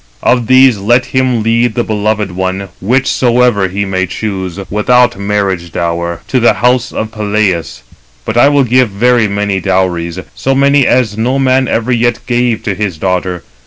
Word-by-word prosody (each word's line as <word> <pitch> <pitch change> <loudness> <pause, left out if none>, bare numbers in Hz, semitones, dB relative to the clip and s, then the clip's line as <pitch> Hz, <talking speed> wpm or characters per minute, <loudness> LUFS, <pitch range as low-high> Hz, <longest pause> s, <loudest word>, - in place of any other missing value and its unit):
Of 125 -3 +1
these 130 -4 +5
let 120 +5 +2
him 130 -3 0
lead 115 +1 +1
the 120 - 0
beloved 105 -2 -1
one, 95 +1 -3
whichsoever 120 -1 +1
he 100 +2 -3
may 95 -1 -2
choose, 95 -2 -5
without 120 +2 +2
marriage 100 -4 -2
dower, 85 0 -3
to 130 - +1
the 120 - +4
house 125 +1 +1
of 110 0 -4
Peleus; 105 - -2 0.4
but 110 - -3
I 120 +4 +5
will 145 -1 +3
give 125 -1 +2
very 115 +3 +2
many 100 -1 -1
dowries, 90 -3 -1 0.2
so 135 0 -1
many 140 0 +3
as 110 -4 +1
no 125 +4 0
man 130 -1 +2
ever 115 +2 -1
yet 120 0 +1
gave 120 -2 0
to 100 - -2
his 95 -4 -3
daughter. 90 0 -2
110 Hz, 165 wpm, -12 LUFS, 95-125 Hz, 0.4 s, these